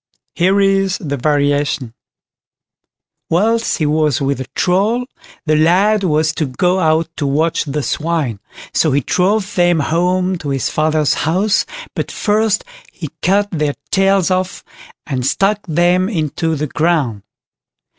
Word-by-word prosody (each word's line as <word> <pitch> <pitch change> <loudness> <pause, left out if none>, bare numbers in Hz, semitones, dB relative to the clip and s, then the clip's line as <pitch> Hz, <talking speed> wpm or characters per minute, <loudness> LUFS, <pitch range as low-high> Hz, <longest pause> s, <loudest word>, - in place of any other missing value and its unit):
Here 190 +3 +2
is 195 -1 +2
the 145 -4 -4
variation: 145 -2 0 1.4
"Whilst 225 +7 +1
he 155 - 0
was 150 -1 +1
with 140 -1 -1
the 130 - -5
Troll, 210 +7 +1 0.4
the 155 -1 +2
lad 190 +7 +3
was 155 -2 +1
to 155 - 0
go 180 +8 0
out 160 -1 +2
to 145 - -1
watch 155 +5 0
the 145 0 -3
swine, 150 -11 -2 0.3
so 155 -4 +2
he 140 - +2
drove 195 - 0
them 175 -2 +3
home 180 +4 0
to 145 - -5
his 135 -2 -1
father's 155 -1 +1 0.2
house, 195 +5 +1 0.3
but - - -3
first 215 0 +1 0.3
he 155 -4 -7
cut 200 +3 +1
their 150 -4 -1 0.2
tails 195 -1 +2
off, 185 0 -2 0.4
and 130 -4 -3
stuck 195 +10 +1
them 175 +3 +2
into 160 -3 -1
the 150 +1 -2
ground. 150 -8 0
165 Hz, 140 wpm, -16 LUFS, 150-190 Hz, 1.4 s, lad